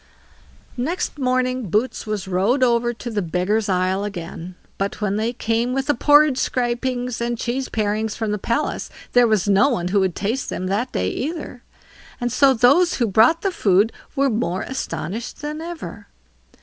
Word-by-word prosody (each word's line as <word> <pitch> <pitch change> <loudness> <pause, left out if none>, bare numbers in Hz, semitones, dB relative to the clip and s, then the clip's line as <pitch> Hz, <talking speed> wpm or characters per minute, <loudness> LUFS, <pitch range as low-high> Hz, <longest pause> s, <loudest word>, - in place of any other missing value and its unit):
Next 295 +4 -2
morning 255 -3 0
Boots 220 +5 -1
was 210 -2 -3
rowed 200 +9 +2
over 240 -1 +2
to 240 0 -7
the 210 -2 -1
Beggars' 185 +5 0
isle 185 +1 +1
again; 175 -2 -6 0.2
but 195 +1 -2
when 205 -2 0
they 220 +2 0
came 235 +1 -1
with 270 0 -1
the 290 - +2
porridge 290 +1 +5
scrapings 245 0 -1
and 235 0 -1
cheese 250 +3 -2
parings 215 0 -1
from 220 -2 -2
the 210 - -2
palace, 265 +9 -2 0.2
there 245 -1 +5
was 215 -3 +1
no 200 +5 +4
one 180 -9 -1
who 200 +2 +2
would 190 -3 0
taste 225 +6 -2
them 185 - -3
that 205 +7 -1
day 90 0 -1
either, 295 -4 -5 0.6
and 245 -1 -1
so 275 +2 +5
those 275 +9 +4
who 240 - +1
brought 225 - +4
the 390 - +1
food 205 - +3 0.2
were 275 0 +3
more 215 -6 -1
astonished 240 - -5
than 300 +1 -4
ever. 330 - -7
235 Hz, 175 wpm, -21 LUFS, 200-255 Hz, 0.6 s, porridge